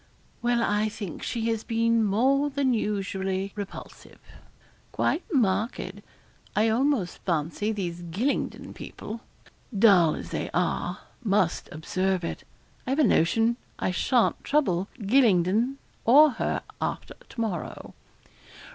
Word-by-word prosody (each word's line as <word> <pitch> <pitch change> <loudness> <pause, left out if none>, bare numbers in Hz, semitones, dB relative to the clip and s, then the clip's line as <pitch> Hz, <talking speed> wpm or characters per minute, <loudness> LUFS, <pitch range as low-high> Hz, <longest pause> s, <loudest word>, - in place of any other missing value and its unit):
'Well, 240 -1 +2
I 210 0 +1
think 205 -6 -7
she 230 -2 -2
has 225 -1 -1
been 230 0 +2
more 265 +8 +2
than 275 -2 +1
usually 195 -3 -2
repulsive 205 -2 -8 0.7
quite 340 - 0
marked; 220 - 0 0.5
I 220 +2 +3
almost 240 -5 +1
fancy 170 +5 -1
these 175 -5 -4
Gylingden 190 - -2
people, 220 +2 -8 0.6
dull 195 -7 +6
as - - -8
they - - -3
are, - - 0 0.3
must 200 -5 +1
observe 185 +3 -1
it. 165 - -4 0.4
I - - -2
have 270 - +1
a 310 - +4
notion 225 - +3 0.2
I - - -1
sha'n't 235 +6 +1
trouble 195 - +1 0.2
Gylingden 220 +1 +3 0.3
or 290 +6 +7
her 225 - -2 0.2
after - - -3
to - - -14
morrow.' 210 -8 -4
215 Hz, 120 wpm, -26 LUFS, 190-240 Hz, 0.7 s, or